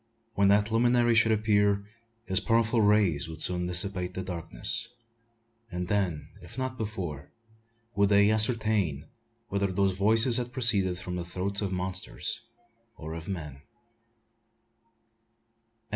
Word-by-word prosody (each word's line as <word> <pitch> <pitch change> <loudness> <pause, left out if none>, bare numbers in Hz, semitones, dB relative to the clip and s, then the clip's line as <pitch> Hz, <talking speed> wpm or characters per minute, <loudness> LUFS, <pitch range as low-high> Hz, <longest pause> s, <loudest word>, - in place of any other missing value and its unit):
When 100 -2 +3
that 105 +2 +3
luminary 120 +1 +3
should 115 0 +4
appear, 105 -2 +2 0.4
his 95 -3 +2
powerful 115 0 +2
rays 100 -8 +2
would 80 -1 -9
soon 90 +1 0
dissipate 90 0 0
the 95 - -3
darkness; 90 - -2 0.8
and 90 -3 -5
then, 95 -7 -1
if 85 +6 -12
not 130 -1 -3
before, 95 - -5 0.6
would 100 0 +2
they 100 +1 +5
ascertain 110 - 0 0.4
whether 100 0 0
those 95 0 +1
voices 115 +5 +4
had 125 0 -4
proceeded 100 -8 +1
from 90 0 -6
the 90 - -3
throats 95 +4 -3
of 100 -2 -2
monsters 95 0 -4 0.6
or 80 0 -7
of 80 0 -8
men. 75 -8 -6
100 Hz, 130 wpm, -28 LUFS, 90-110 Hz, 0.8 s, they